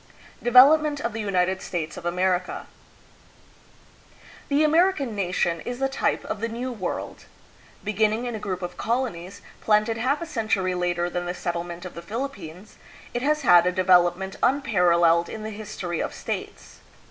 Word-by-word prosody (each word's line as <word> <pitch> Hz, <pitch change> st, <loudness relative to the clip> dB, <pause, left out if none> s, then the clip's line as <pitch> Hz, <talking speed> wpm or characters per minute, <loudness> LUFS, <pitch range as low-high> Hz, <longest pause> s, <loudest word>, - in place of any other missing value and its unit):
Development 290 Hz, +5 st, +6 dB
of 235 Hz, -, -3 dB
the 225 Hz, -, -3 dB
United 190 Hz, -2 st, 0 dB
States 165 Hz, -3 st, -4 dB
of 170 Hz, -, -6 dB
America. 180 Hz, +1 st, -1 dB, 1.8 s
The 290 Hz, +2 st, +2 dB
American 315 Hz, -, +2 dB
nation 175 Hz, -3 st, -1 dB
is 245 Hz, 0 st, -5 dB
the 270 Hz, +1 st, +1 dB
type 270 Hz, -, -1 dB
of 210 Hz, -, -4 dB
the 230 Hz, -, 0 dB
New 240 Hz, +3 st, -4 dB
World. 200 Hz, -7 st, -5 dB, 0.6 s
Begin 215 Hz, 0 st, +2 dB
ning 225 Hz, +3 st, -3 dB
in 240 Hz, -, -3 dB
a 220 Hz, -, -4 dB
group 185 Hz, -3 st, -4 dB
of 175 Hz, 0 st, -6 dB
colonies, 200 Hz, -6 st, -3 dB, 0.2 s
planted 215 Hz, +1 st, +2 dB
half 270 Hz, +5 st, +1 dB
a 335 Hz, -, -5 dB
century 215 Hz, -, -1 dB
later 175 Hz, -1 st, -1 dB
than 175 Hz, 0 st, -4 dB
the 180 Hz, -, -3 dB
settlement 175 Hz, 0 st, -4 dB
of 185 Hz, -, -8 dB
the 170 Hz, -, -8 dB
Philippines, 200 Hz, -, -7 dB, 0.4 s
it 240 Hz, -, -2 dB
has 300 Hz, +2 st, +1 dB
had 175 Hz, -6 st, +6 dB
a -, -, +2 dB
de 185 Hz, +1 st, -1 dB
velopment 180 Hz, +1 st, +3 dB
unparalleled 175 Hz, -10 st, +3 dB
in 220 Hz, -, -7 dB
the 220 Hz, -, -5 dB
history 190 Hz, -5 st, -5 dB
of -, -, -3 dB
states. -, -, -6 dB
200 Hz, 165 wpm, -24 LUFS, 175-245 Hz, 1.8 s, Development